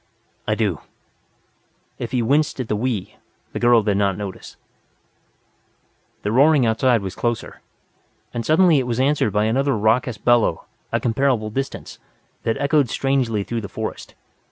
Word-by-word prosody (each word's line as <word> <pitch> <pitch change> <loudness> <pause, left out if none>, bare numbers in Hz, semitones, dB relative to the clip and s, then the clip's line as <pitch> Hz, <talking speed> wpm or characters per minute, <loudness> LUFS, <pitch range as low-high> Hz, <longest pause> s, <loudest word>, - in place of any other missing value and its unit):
"I - - +1
do." - - -1 1.2
If 120 - -5
he 125 -2 0
winced 145 +4 +1
at 125 - -3
the - - +1
"we" 110 -3 -3 0.4
the - - -3
girl 120 -2 +4
did 100 -2 +1
not 100 -2 +1
notice. 100 -3 -8 1.7
The 105 - -1
roaring 140 +2 +4
outside 115 0 +2
was 95 - -5
closer. 120 -1 -3 0.7
And 120 - -3
suddenly 160 +1 +4
it 130 - -2
was 120 0 -2
answered 135 -5 +2
by 105 +1 +1
another 135 +3 +1
raucous 110 +2 +1
bellow, 115 -6 +2 0.3
at - - -1
considerable 120 -2 +1
distance, 135 +4 -5 0.4
that 115 - -1
echoed 140 -2 +2
strangely 125 -6 0
through 115 +2 -4
the 100 - -7
forest. - - -6
120 Hz, 150 wpm, -21 LUFS, 110-135 Hz, 1.7 s, girl